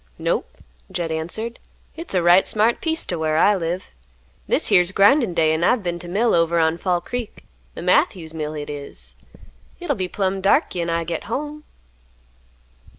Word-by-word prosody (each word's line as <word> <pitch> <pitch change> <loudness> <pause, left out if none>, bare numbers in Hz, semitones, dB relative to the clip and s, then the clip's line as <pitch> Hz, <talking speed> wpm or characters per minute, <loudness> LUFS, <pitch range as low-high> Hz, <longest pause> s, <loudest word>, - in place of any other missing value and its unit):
"Nope," - - -2 0.3
Jed 165 -2 -3
answered, 195 +9 -3 0.3
"Hit's 330 - -5
a 180 - +2
right 175 +2 +5
smart 220 +2 +2
piece 320 0 +1
to 175 - -3
whar 155 -1 0
I 205 +5 +5
live. 180 -1 -3 0.6
This - - +2
here's 180 0 +4
grindin' 205 - +4
day, 160 -2 +3
an' 160 +2 -1
I've 230 +3 +2
been 175 -1 -3
t' 175 - -7
mill 215 +7 +1
over 165 0 +2
on 160 +1 +2
Fall 180 -2 0
Creek; 245 0 -6 0.3
the - - -7
Matthews 170 - +1
mill 155 -1 -4
hit 150 -1 -6
is. 145 -1 -7 0.6
Hit'll 350 -5 -2
be 185 -2 -2
plumb 190 0 -2
dark 200 - +3
'gin 170 -1 -2
I 165 0 0
git 165 0 -4
home. 300 +6 -5
180 Hz, 175 wpm, -21 LUFS, 165-220 Hz, 0.6 s, right